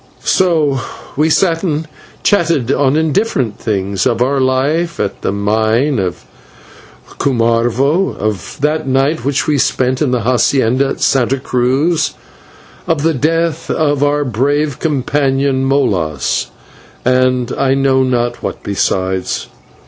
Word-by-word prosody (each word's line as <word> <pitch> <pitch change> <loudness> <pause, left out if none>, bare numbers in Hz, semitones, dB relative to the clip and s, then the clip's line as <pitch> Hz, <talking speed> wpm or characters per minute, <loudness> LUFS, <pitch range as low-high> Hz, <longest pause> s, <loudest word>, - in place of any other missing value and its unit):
So 155 -7 +2 0.4
we 155 +3 +2
sat 165 0 +2
and 160 -3 -2 0.4
chatted 165 - +2
on 150 +3 +2
different 135 - -1
things 100 -1 -1
of 120 -2 0
our 135 +3 +1
life 145 +7 0
at 100 - -3
the - - -1
mine 110 +6 +1
at 90 -2 -1 1.1
Cumarvo, 120 +7 +1
of 105 0 -4
that 155 0 0
night 135 +1 +1
which 140 +1 0
we 150 -2 +1
spent 130 +1 0
in 150 - +2
the 125 -1 0
/hacienda/ 130 +2 +2
at - - -5
Santa 135 0 +2
Cruz, 140 +6 0 0.7
of 160 -3 0
the 165 0 +2
death 165 +4 -1
of 145 -2 +1
our 145 0 +1
brave 140 +4 0
companion, 135 -2 0
Molas, 95 - 0 0.6
and 130 -1 +2
I 135 -1 +1
know 135 -1 +2
not 120 -2 -1
what - - -5
besides. 95 -2 -1
135 Hz, 125 wpm, -15 LUFS, 120-150 Hz, 1.1 s, So